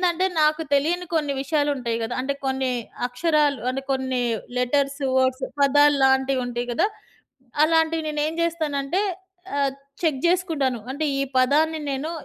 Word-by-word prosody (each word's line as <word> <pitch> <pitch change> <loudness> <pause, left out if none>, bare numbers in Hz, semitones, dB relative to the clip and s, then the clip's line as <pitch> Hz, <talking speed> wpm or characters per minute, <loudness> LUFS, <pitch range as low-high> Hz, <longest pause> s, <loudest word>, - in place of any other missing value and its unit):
నేనేందంటే 350 +2 +1
నాకు 305 +1 +3
తెలియని 345 +6 +1
కొన్ని 295 -3 +1
విషయాలు 290 +1 0
ఉంటాయి 235 -3 -2
గదా! 225 +2 -3
అంటే 275 +2 -2
కొన్ని 265 -1 0 0.4
అక్షరాలు 290 0 +1
అంటే 270 +1 -3
కొన్ని 260 -1 0 0.4
లెటర్స్, 275 +3 0 0.2
వర్డ్స్, 260 0 +2 0.2
పదాల్లాంటివి 275 -2 +4
ఉంటాయి 240 0 -3
గదా! 240 - +2 0.8
అలాంటివి 320 0 +2
నేనేం 300 +1 -1
జేస్తానంటే 315 0 -1 0.6
ఆహ్, 280 -1 +2 0.3
చెక్ 300 -5 +1
జేసుకుంటాను. 325 -8 +1
అంటే 305 +3 -2
ఈ - - +1 0.2
పదాన్ని 310 +5 +3
నేను 280 +4 -3
280 Hz, 130 wpm, -23 LUFS, 265-315 Hz, 0.8 s, పదాల్లాంటివి